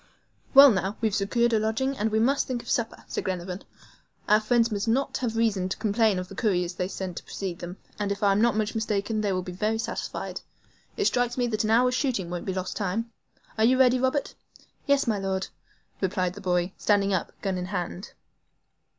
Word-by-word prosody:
"Well, 275 Hz, 0 st, +11 dB
now 195 Hz, 0 st, -1 dB
we've 220 Hz, -2 st, 0 dB
secured 235 Hz, +4 st, +1 dB
a 220 Hz, -, +4 dB
lodging, 225 Hz, +6 st, 0 dB
we 215 Hz, -, 0 dB
must 265 Hz, +6 st, +2 dB
think 245 Hz, -2 st, -3 dB
of -, -, -10 dB
supper," 230 Hz, -2 st, -1 dB
said -, -, -3 dB
Glenarvan. 180 Hz, 0 st, -4 dB, 0.7 s
"Our 210 Hz, -, +6 dB
friends 230 Hz, +1 st, +2 dB
must 205 Hz, +1 st, -2 dB
not 260 Hz, +5 st, +1 dB
have 230 Hz, -3 st, -2 dB
reason 205 Hz, -5 st, +1 dB
to -, -, -3 dB
complain 215 Hz, -1 st, +2 dB
of 180 Hz, 0 st, -4 dB
the 195 Hz, -, -11 dB
couriers 180 Hz, -5 st, 0 dB
they 180 Hz, +1 st, -2 dB
sent 185 Hz, -2 st, -5 dB
to -, -, -6 dB
precede 185 Hz, -3 st, -5 dB
them; 175 Hz, +2 st, -7 dB, 0.2 s
and 205 Hz, -1 st, -1 dB
if 200 Hz, +1 st, -3 dB
I 200 Hz, -, +5 dB
am 195 Hz, +2 st, +2 dB
not 235 Hz, -2 st, +3 dB
much 215 Hz, 0 st, 0 dB
mistaken, 215 Hz, 0 st, -1 dB
they 205 Hz, -2 st, 0 dB
will 185 Hz, -1 st, -1 dB
be 180 Hz, -, -6 dB
very 215 Hz, +5 st, -1 dB
satisfied. 225 Hz, -, -4 dB, 0.6 s
It 410 Hz, -, +1 dB
strikes 245 Hz, -5 st, +1 dB
me 245 Hz, -, +2 dB
that 220 Hz, -2 st, -1 dB
an 215 Hz, -, -1 dB
hour's 250 Hz, +3 st, +4 dB
shooting 240 Hz, -, -1 dB
won't 175 Hz, -1 st, -4 dB
be 190 Hz, -, -2 dB
lost 185 Hz, 0 st, -3 dB
time. 215 Hz, +3 st, -2 dB, 0.5 s
Are -, -, +4 dB
you 255 Hz, +3 st, +5 dB
ready, 255 Hz, -1 st, +5 dB
Robert?" 260 Hz, +3 st, 0 dB, 0.5 s
"Yes, 280 Hz, -1 st, +3 dB
my 220 Hz, -4 st, 0 dB
Lord," 190 Hz, -1 st, -2 dB, 0.5 s
replied 185 Hz, -2 st, 0 dB
the 205 Hz, -, -10 dB
boy, 180 Hz, 0 st, 0 dB
standing 200 Hz, -1 st, +2 dB
up, 185 Hz, -, -1 dB
gun 190 Hz, -2 st, -1 dB
in 180 Hz, -, -3 dB
hand. 180 Hz, 0 st, -5 dB
210 Hz, 210 wpm, -26 LUFS, 190-235 Hz, 0.7 s, Well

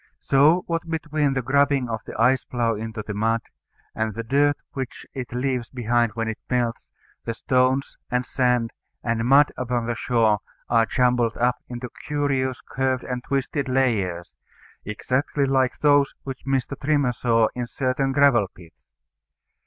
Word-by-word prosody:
So, 150 Hz, +6 st, +4 dB
what 165 Hz, 0 st, -3 dB
between 155 Hz, -3 st, 0 dB
the 135 Hz, -1 st, -1 dB
grubbing 140 Hz, 0 st, +2 dB
of 115 Hz, -2 st, -3 dB
the -, -, -8 dB
ice 130 Hz, 0 st, +4 dB
plough 120 Hz, -2 st, 0 dB
into 110 Hz, 0 st, -5 dB
the 105 Hz, -, -4 dB
mud, 110 Hz, +2 st, +1 dB, 0.5 s
and 110 Hz, -1 st, -2 dB
the 115 Hz, -, -3 dB
dirt 145 Hz, +4 st, +2 dB
which 130 Hz, -2 st, -6 dB
it 130 Hz, -3 st, -6 dB
leaves 125 Hz, -1 st, -1 dB
behind 120 Hz, -2 st, +1 dB
when 115 Hz, -1 st, -2 dB
it 110 Hz, -, -4 dB
melts, 120 Hz, -2 st, -1 dB, 0.3 s
the 115 Hz, -, -3 dB
stones, 130 Hz, +2 st, +1 dB
and 125 Hz, 0 st, 0 dB
sand, 125 Hz, -3 st, +1 dB, 0.3 s
and 115 Hz, -1 st, 0 dB
mud 140 Hz, +3 st, +6 dB
upon 125 Hz, -2 st, -1 dB
the 120 Hz, -, -1 dB
shore 115 Hz, -3 st, +2 dB, 0.3 s
are 115 Hz, -1 st, +3 dB
jumbled 125 Hz, -2 st, +2 dB
up 125 Hz, +1 st, +2 dB
into 125 Hz, 0 st, -5 dB, 0.2 s
curious 135 Hz, -3 st, 0 dB
curved 130 Hz, -1 st, -1 dB
and 125 Hz, -1 st, -4 dB
twisted 140 Hz, 0 st, -2 dB
layers, 105 Hz, -10 st, 0 dB, 0.5 s
exactly 130 Hz, +7 st, -1 dB
like 130 Hz, -1 st, +1 dB
those 145 Hz, -2 st, +3 dB
which 135 Hz, 0 st, -8 dB
Mr. 135 Hz, 0 st, 0 dB
Trimmer 145 Hz, -3 st, +2 dB
saw 115 Hz, -2 st, +2 dB
in 120 Hz, -1 st, -4 dB
certain 135 Hz, +2 st, -1 dB
gravel 135 Hz, -7 st, +4 dB
pits. 85 Hz, -2 st, -17 dB
125 Hz, 155 wpm, -24 LUFS, 115-135 Hz, 0.5 s, mud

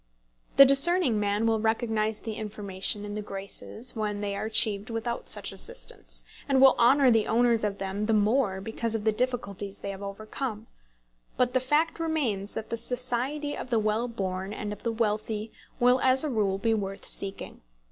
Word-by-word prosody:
The 275 Hz, -, +11 dB
discerning 275 Hz, -, +5 dB
man 205 Hz, +2 st, 0 dB
will 225 Hz, -1 st, +2 dB
recognise 220 Hz, -1 st, 0 dB
the 225 Hz, -, -5 dB
information 205 Hz, -1 st, -2 dB
and 205 Hz, 0 st, -6 dB
the 210 Hz, -, -3 dB
graces 200 Hz, +4 st, -5 dB
when 210 Hz, -2 st, -2 dB
they 200 Hz, -1 st, -3 dB
are 200 Hz, -, -3 dB
achieved 215 Hz, -1 st, +3 dB
without 235 Hz, +1 st, -4 dB
such -, -, +1 dB
assistance, 485 Hz, +1 st, -3 dB, 0.2 s
and 270 Hz, -1 st, +3 dB
will 270 Hz, 0 st, +8 dB
honour 260 Hz, +2 st, +5 dB
the 225 Hz, -2 st, +2 dB
owners 230 Hz, 0 st, +2 dB
of 205 Hz, -1 st, -1 dB
them 195 Hz, +2 st, -3 dB
the 225 Hz, -, +2 dB
more 210 Hz, -2 st, +1 dB
because 225 Hz, +2 st, -2 dB
of 215 Hz, -, -3 dB
the 220 Hz, -, +3 dB
difficulties 205 Hz, -4 st, -3 dB
they 200 Hz, -, -4 dB
have 195 Hz, 0 st, -9 dB
overcome; 215 Hz, +3 st, -5 dB, 0.7 s
but 250 Hz, -1 st, +1 dB
the 255 Hz, -, +3 dB
fact 300 Hz, +6 st, 0 dB
remains 265 Hz, -12 st, -1 dB
that 220 Hz, -, -6 dB
the 230 Hz, -, -1 dB
society 255 Hz, +5 st, -1 dB
of -, -, -7 dB
the 235 Hz, -, +2 dB
well 215 Hz, +2 st, 0 dB
born 190 Hz, -3 st, -4 dB
and 210 Hz, -1 st, -5 dB
of -, -, -12 dB
the 230 Hz, -, -1 dB
wealthy 215 Hz, -1 st, -2 dB, 0.3 s
will 250 Hz, +1 st, +4 dB
as 260 Hz, +1 st, +3 dB
a 300 Hz, -, -2 dB
rule 200 Hz, -5 st, 0 dB
be 225 Hz, +3 st, +1 dB
worth 195 Hz, -2 st, -4 dB
seeking. 195 Hz, 0 st, -3 dB
220 Hz, 185 wpm, -27 LUFS, 205-245 Hz, 0.7 s, The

